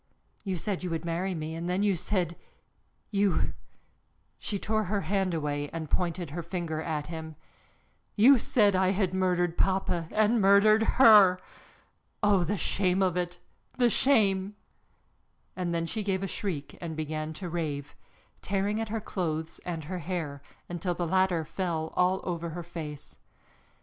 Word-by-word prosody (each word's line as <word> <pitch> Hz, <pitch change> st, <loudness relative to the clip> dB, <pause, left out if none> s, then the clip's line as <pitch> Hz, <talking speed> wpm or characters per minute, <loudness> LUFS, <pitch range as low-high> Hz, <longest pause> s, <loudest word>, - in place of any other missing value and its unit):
You 190 Hz, -3 st, -2 dB
said 190 Hz, +2 st, -3 dB
you 180 Hz, -, -2 dB
would 165 Hz, 0 st, -3 dB
marry 175 Hz, +3 st, -1 dB
me, 155 Hz, 0 st, -4 dB
and 165 Hz, +2 st, -4 dB
then 185 Hz, +3 st, +1 dB
you 200 Hz, -2 st, +3 dB
said, 175 Hz, -1 st, -1 dB, 0.8 s
you," 200 Hz, -2 st, +1 dB, 0.9 s
she 205 Hz, -, -3 dB
tore 215 Hz, +2 st, -1 dB
her 200 Hz, +2 st, -1 dB
hand 190 Hz, -2 st, 0 dB
away 145 Hz, -2 st, -2 dB
and 160 Hz, -2 st, -6 dB
pointed 175 Hz, -3 st, -1 dB
her 170 Hz, +3 st, -4 dB
finger 170 Hz, -2 st, -3 dB
at 155 Hz, -2 st, -3 dB
him, 160 Hz, -1 st, -7 dB, 0.8 s
"you 245 Hz, +5 st, +7 dB
said 205 Hz, -4 st, +3 dB
I 185 Hz, 0 st, +3 dB
had 190 Hz, -2 st, 0 dB
murdered 180 Hz, -2 st, 0 dB
papa 185 Hz, -3 st, +1 dB
and 215 Hz, +1 st, +2 dB
murdered 200 Hz, +3 st, +6 dB, 0.2 s
her! 210 Hz, -7 st, +8 dB, 0.9 s
Oh, 200 Hz, -3 st, +4 dB
the 205 Hz, +4 st, -1 dB
shame 185 Hz, +2 st, +1 dB
of 185 Hz, -2 st, +1 dB
it, 175 Hz, 0 st, -2 dB, 0.4 s
the 245 Hz, -2 st, +4 dB
shame!" 205 Hz, -7 st, +3 dB, 1.0 s
And 180 Hz, -2 st, -2 dB
then 165 Hz, 0 st, 0 dB
she 215 Hz, +6 st, -3 dB
gave 195 Hz, -2 st, -1 dB
a -, -, -1 dB
shriek 170 Hz, -7 st, -4 dB
and 165 Hz, -2 st, -5 dB
began 155 Hz, 0 st, -3 dB
to 180 Hz, +3 st, -6 dB
rave, 150 Hz, -4 st, -4 dB, 0.5 s
tearing 200 Hz, +3 st, -1 dB
at 225 Hz, -, -4 dB
her 220 Hz, 0 st, -2 dB
clothes 160 Hz, -5 st, -3 dB
and 165 Hz, -3 st, -4 dB
her 180 Hz, +4 st, -5 dB
hair, 160 Hz, -5 st, -4 dB, 0.3 s
until 175 Hz, +1 st, -2 dB
the 175 Hz, -, -2 dB
latter 185 Hz, -2 st, +2 dB
fell 165 Hz, -3 st, -3 dB
all 185 Hz, +1 st, +2 dB
over 170 Hz, -2 st, -3 dB
her 175 Hz, -, -5 dB
face. 160 Hz, -4 st, -8 dB
180 Hz, 160 wpm, -28 LUFS, 165-195 Hz, 1.0 s, her